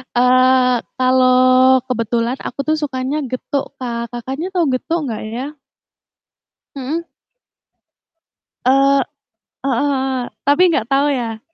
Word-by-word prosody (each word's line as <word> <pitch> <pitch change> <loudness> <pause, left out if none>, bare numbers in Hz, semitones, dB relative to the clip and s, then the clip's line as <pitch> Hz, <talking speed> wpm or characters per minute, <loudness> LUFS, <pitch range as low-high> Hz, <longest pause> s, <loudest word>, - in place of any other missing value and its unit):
Eee, 255 0 +4 0.2
kalau 255 0 +4
kebetulan 235 0 -1
aku - - -7
tuh 310 - +2
sukanya 285 -1 -3
getuk 275 +2 -3
Kak, 235 -2 -4
Kakaknya 265 +9 -5
tahu 350 -3 +1
getuk 315 +3 -2
enggak 220 -2 -4
ya? 270 +6 -5 1.2
Mhm. 285 +5 -3 1.6
Eee, 275 +1 +4 0.6
heeh 265 -4 0
heeh, 265 -1 -1 0.2
tapi 285 +5 +3
enggak 270 -9 0
tahu 280 +2 +3
ya? 235 -5 -2
260 Hz, 110 wpm, -18 LUFS, 250-280 Hz, 1.6 s, Eee